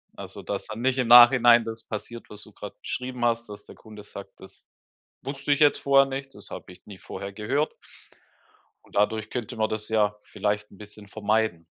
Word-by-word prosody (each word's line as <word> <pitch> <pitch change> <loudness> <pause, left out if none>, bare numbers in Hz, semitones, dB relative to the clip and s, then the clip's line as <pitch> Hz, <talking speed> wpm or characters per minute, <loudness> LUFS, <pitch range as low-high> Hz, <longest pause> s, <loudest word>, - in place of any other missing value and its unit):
Also, - - -9
dass - - -4
dann 110 +2 -7
nicht 130 +1 +1
im 125 -2 0
Nachhinein 120 0 +8
das 115 0 -7
passiert, 115 +2 -8
was 105 0 -10
du 110 - -16
grad 105 0 -10
beschrieben 125 -1 -5
hast, 115 0 0
dass 105 0 -10
der - - -14
Kunde 105 -1 -13
sagt: - - -12
„Das - - -16 0.6
wusste 140 +1 -3
ich 145 - +2
jetzt 145 -1 +5
vorher 140 0 +4
nicht, 135 0 -6
das - - -15
habe - - -9
ich 90 - -19
nie 100 -3 -11
vorher 100 +1 -8
gehört.“ 130 +10 -1 1.1
Und - - -19
dadurch 110 +1 +1
könnte 120 -5 -5
man 110 -1 0
das 110 -1 -4
ja 105 -2 +1
vielleicht 105 0 -3
'n 100 - -16
bisschen 105 0 -13
vermeiden. 110 -5 -1
110 Hz, 200 wpm, -25 LUFS, 105-125 Hz, 1.1 s, Nachhinein